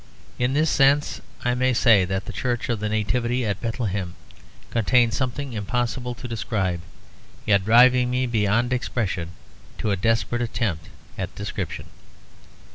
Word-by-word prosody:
In 125 +2 +1
this 155 +2 +2
sense 140 +1 +3 0.2
I 125 - +2
may 130 +1 +2
say 115 -6 +5
that 95 +1 -3
the 110 - -7
Church 120 +3 -2
of 120 -3 0
the 105 0 -2
Nativity 120 +3 0
at 100 -2 -2
Bethlehem 105 -7 -3 0.6
contains 120 0 +3
something 130 0 -3
impossible 120 +3 -2
to 125 - -8
describe, 95 -6 -2 0.6
yet 100 -2 +3
driving 125 +2 +6
me 125 +1 0
beyond 115 +1 +1
expression 100 -8 -2 0.5
to 105 - -1
a - - +2
desperate 115 +4 0
attempt 105 -9 -2 0.3
at - - -4
description. - - -5
120 Hz, 140 wpm, -24 LUFS, 105-125 Hz, 0.6 s, driving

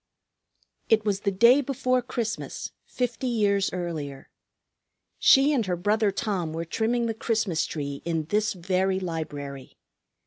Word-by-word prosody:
It 220 -1 +3
was 200 -2 +1
the 200 - 0
day 235 +8 +6
before 255 -2 0
Christmas, 235 -2 -4 0.2
fifty 250 +1 -2
years 205 -4 +1
earlier. 155 -6 -5 0.9
She 275 +3 +6
and 250 -5 +2
her 180 - 0
brother 210 +4 +2
Tom 190 -5 -2
were 165 +1 -3
trimming 230 +7 0
the 225 - -1
Christmas 220 -7 0
tree 140 -2 -5
in 165 -2 -1
this 210 0 +1
very 190 +1 0
library. 145 -6 -6
200 Hz, 135 wpm, -26 LUFS, 170-230 Hz, 0.9 s, day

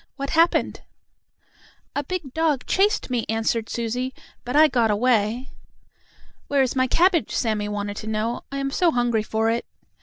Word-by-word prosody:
"What 275 0 -4
happened?" 330 +2 +2 1.1
"A 285 - -1
big 300 -4 -5
dog 315 -5 0
chased 405 -6 +1
me," 240 -2 0
answered 225 0 -1
Susie. 245 +3 -3 0.3
"But 250 - -4
I 310 +1 +7
got 240 -6 +1
away." 230 +3 +1 1.0
"Where 280 -1 +3
is 260 - -2
my 260 0 +2
cabbage?" 345 +4 +2
Sammie 215 -3 -1
wanted 205 0 -4
to 215 - -6
know. 220 +2 -2
"I 275 - -4
am 275 0 -2
so 350 +4 +3
hungry 240 -4 +1
for 220 +1 0
it." 235 - -1
250 Hz, 160 wpm, -23 LUFS, 225-285 Hz, 1.1 s, I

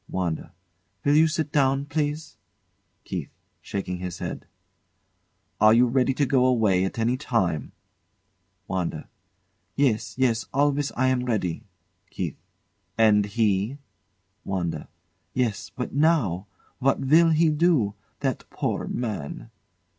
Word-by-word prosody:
WANDA. 85 -4 -3 0.5
Will 145 +1 +4
you 160 +1 +6
sit 155 -2 -2
down, 135 -1 +2
please? 150 +1 -2 0.7
KEITH. - - -5 0.3
[Shaking 90 -2 -4
his 90 -1 -5
head] - - -6 1.1
Are 110 +1 +6
you 120 +2 +6
ready 130 +2 +2
to 145 - +2
go 130 -1 +3
away 105 -7 +3
at 95 - -4
any 115 +3 +1
time? 95 - -1 1.0
WANDA. 90 -4 -3 0.7
Yes, 130 -6 +1
yes; 120 -4 +1
always 145 0 +2
I 130 - +1
am 125 -1 0
ready. 100 -8 -2 0.4
KEITH. 85 -5 -4 0.6
And 105 -2 +4
he? 105 +3 0 0.7
WANDA. 90 -3 -3 0.5
Yes 120 -5 -1
but 125 - -5
now! 130 - +2 0.3
What 135 +1 +2
will 160 +5 +5
he 160 0 +4
do? 150 - +2 0.3
That - - -2
poor - - -2
man! 110 - -4
125 Hz, 120 wpm, -25 LUFS, 100-140 Hz, 1.1 s, you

